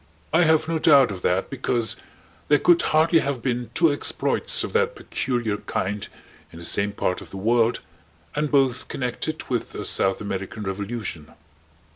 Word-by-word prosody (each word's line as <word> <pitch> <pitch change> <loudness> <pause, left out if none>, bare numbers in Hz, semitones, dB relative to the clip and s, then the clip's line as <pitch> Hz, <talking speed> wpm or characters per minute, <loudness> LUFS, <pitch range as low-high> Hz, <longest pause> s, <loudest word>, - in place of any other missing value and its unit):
I 170 +2 +5
have 160 0 +3
no 165 -1 0
doubt 140 -7 +6
of 95 -2 -7
that 90 +2 0
because 120 -4 0 0.5
there 145 - +5
could 170 +4 +4
hardly 160 +2 +3
have 135 -5 -3
been 125 -2 -2
two 165 -3 +4
exploits 145 - +1
of - - -5
that 470 +1 +1
peculiar 120 -5 -2
kind 100 0 -3 0.4
in - - -12
the 85 - -9
same 100 +3 +1
part 90 -2 -2
of - - -12
the 95 - -8
world 115 +3 +2 0.5
and 150 0 0
both 135 -3 +2
connected 130 +5 -4
with 120 -3 -3
a - - -5
South 95 0 +2
American 100 +1 -5
revolution. 100 -5 -5
120 Hz, 165 wpm, -24 LUFS, 100-150 Hz, 0.5 s, doubt